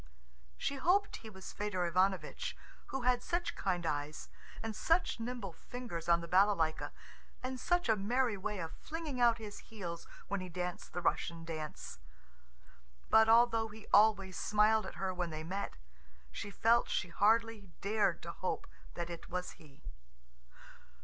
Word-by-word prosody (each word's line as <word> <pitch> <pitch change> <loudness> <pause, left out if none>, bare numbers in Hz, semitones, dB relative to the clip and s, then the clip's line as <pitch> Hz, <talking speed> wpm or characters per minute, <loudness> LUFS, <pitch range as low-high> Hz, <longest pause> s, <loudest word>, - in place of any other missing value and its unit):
She 280 - -2
hoped 380 +9 +2
he 220 - -10
was 190 -3 -9
Fedor 195 -4 -1
Ivanovitch, 185 -1 0 0.3
who 270 -2 -3
had 250 0 +3
such 345 +6 -1
kind 180 -3 -1
eyes, 145 0 -3 0.3
and 225 -1 -3
such 330 +2 +2
nimble 230 -6 -4
fingers 175 -5 -6
on 170 0 +5
the 170 - -6
balalaika, 185 -3 +3 0.5
and 255 0 -3
such 350 +4 +1
a 220 - +5
merry 235 +3 +1
way 200 +2 -3
of 165 -3 -4
flinging 310 -5 -5
out 235 -1 +5
his 210 -3 -8
heels 175 -6 -7 0.2
when 200 -1 -1
he 185 - -6
danced 180 0 -4
the 175 - -3
Russian 165 0 0
dance. 155 - -6 1.1
But 220 0 +7
although 230 -1 +5
he 215 0 -12
always 200 -4 +5
smiled 210 0 +3
at - - -8
her 190 -1 -1
when 175 -1 -2
they 155 0 -5
met, 190 +5 -3 0.6
she 205 - -5
felt 230 +4 +3
she 175 - 0
hardly 220 +2 +2
dared 210 +1 +1
to - - -4
hope - - -3 0.3
that 170 0 -3
it 170 - -8
was 180 0 -3
he. 145 -3 -18
205 Hz, 155 wpm, -34 LUFS, 175-230 Hz, 1.1 s, But